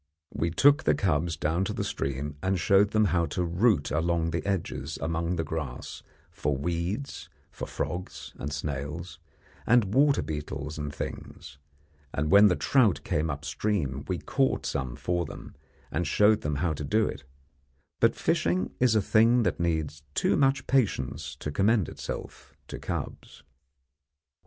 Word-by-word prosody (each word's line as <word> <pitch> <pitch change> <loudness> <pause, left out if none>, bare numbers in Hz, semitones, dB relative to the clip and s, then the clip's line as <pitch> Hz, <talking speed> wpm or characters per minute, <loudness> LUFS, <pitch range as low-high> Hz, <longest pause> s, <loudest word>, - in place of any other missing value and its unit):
We 80 +3 0
took 145 - +4
the - - +4
cubs 80 -3 0
down 80 +4 0
to 105 - -3
the - - -2
stream 70 +2 -3
and 95 0 0
showed 100 +2 +4
them 110 0 +3
how 85 -2 +2
to 90 - -2
root 90 -1 +2
along 85 +1 +1
the 80 -1 -2
edges 95 -4 -2
among 85 +2 -1
the 80 - -1
grass 75 -5 -5 0.4
and 75 -2 +1
weeds 90 +10 -3 0.2
for - - -6
frogs 90 +2 -5
and 70 - -4
snails, 75 +3 -5 0.5
and 115 -4 +4
water 140 - +4
beetles 75 0 -5
and 75 -1 -3
things, 75 0 -7 0.6
and 75 +1 0
when 100 +2 +8
the 90 - +3
trout 120 -5 +3
came 75 +2 0
upstream 70 -1 -2
we 90 - -1
caught 135 - 0
some 65 -3 -2
for 85 +5 -1
them, - - -9 0.4
and 85 0 -1
showed 105 +7 +4
them 75 0 -2
how 80 +3 0
to 75 - -5
do 110 +10 +2
it; 70 - -5 0.8
but - - +4
fishing 90 +2 0
is 125 -3 +4
a 105 - +3
thing 115 +4 +4
that - - 0
needs 80 -4 -1
too - - +2
much 135 -1 +2
patience 75 - 0
to 75 +1 -5
commend 100 +3 +2
itself - - -7
to - - -6
cubs. - - -6
85 Hz, 155 wpm, -28 LUFS, 75-105 Hz, 0.8 s, when